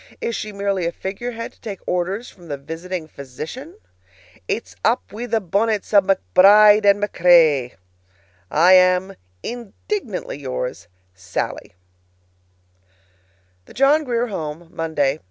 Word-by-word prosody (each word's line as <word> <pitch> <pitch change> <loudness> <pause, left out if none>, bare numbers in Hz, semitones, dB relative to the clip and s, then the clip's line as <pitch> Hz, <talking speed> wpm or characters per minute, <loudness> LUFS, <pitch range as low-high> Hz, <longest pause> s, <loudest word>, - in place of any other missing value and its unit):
Is 230 - -3
she 215 - -5
merely 200 -3 -1
a - - -1
figurehead 230 +6 -6
to - - -29
take 205 -4 -6
orders 185 +6 -2
from 175 -3 -15
the 145 -2 -4
visiting 165 +4 -6
physician? 155 - -9 0.7
It's - - -4
up - - +2
wi' 235 +3 -5
the 225 - +1
bonnets 210 +3 -1
o' 200 - +7
McBride 200 - +5
and 200 0 +5
MacRae! 165 -10 +3 0.7
I 175 +5 +5
am, 185 +1 +4 0.3
Indignantly 235 - -5
yours, 125 -7 -5 0.3
SALLIE. 95 -1 -5 1.9
THE - - -16
JOHN 285 +4 +4
GRIER 240 -3 -1
HOME, 160 -3 -6
Monday. 155 -3 -1
190 Hz, 120 wpm, -21 LUFS, 160-215 Hz, 1.9 s, o